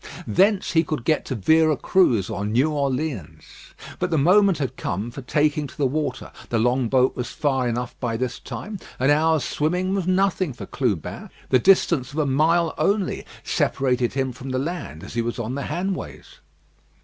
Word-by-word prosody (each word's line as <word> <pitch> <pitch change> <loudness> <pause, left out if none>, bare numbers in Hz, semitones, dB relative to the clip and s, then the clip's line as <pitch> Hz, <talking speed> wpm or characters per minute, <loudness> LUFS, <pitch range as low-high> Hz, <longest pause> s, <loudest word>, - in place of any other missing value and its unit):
Thence 195 +2 +2
he 165 -1 +3
could 155 -6 -4
get 155 - +1
to 130 - -3
Vera 155 +7 +3
Cruz 120 - +2
or 100 - -4
New 120 +9 +1
Orleans. 140 - -2 0.6
But - - 0
the 160 - +1
moment 185 +4 +4
had 135 -4 -3
come 100 +5 -3
for 135 - -8
taking 150 +2 +1
to - - -15
the 145 - +1
water. 140 -1 -2 0.2
The 120 - 0
long 125 +1 +1
boat 130 +1 +3
was 125 - -4
far 135 -4 0
enough 120 +1 -3
by 115 -3 -2
this 125 0 -3
time. 205 0 -7 0.2
An 130 +3 +3
hour's 155 0 +3
swimming 180 +5 -1
was 195 -3 -1
nothing 185 -4 +1
for - - -8
Clubin. 105 - -3 0.2
The 130 - +4
distance 150 -5 +3
of - - -8
a 155 - +2
mile 160 +5 +2
only 200 -2 0 0.2
separated 125 -3 0
him 135 -1 -1
from 125 +2 -9
the 130 - -1
land, 140 - -4
as - - -9
he 115 - 0
was 120 0 -3
on 120 +1 -3
the 140 +1 -3
Hanways. 175 - -5
140 Hz, 185 wpm, -23 LUFS, 125-165 Hz, 0.6 s, moment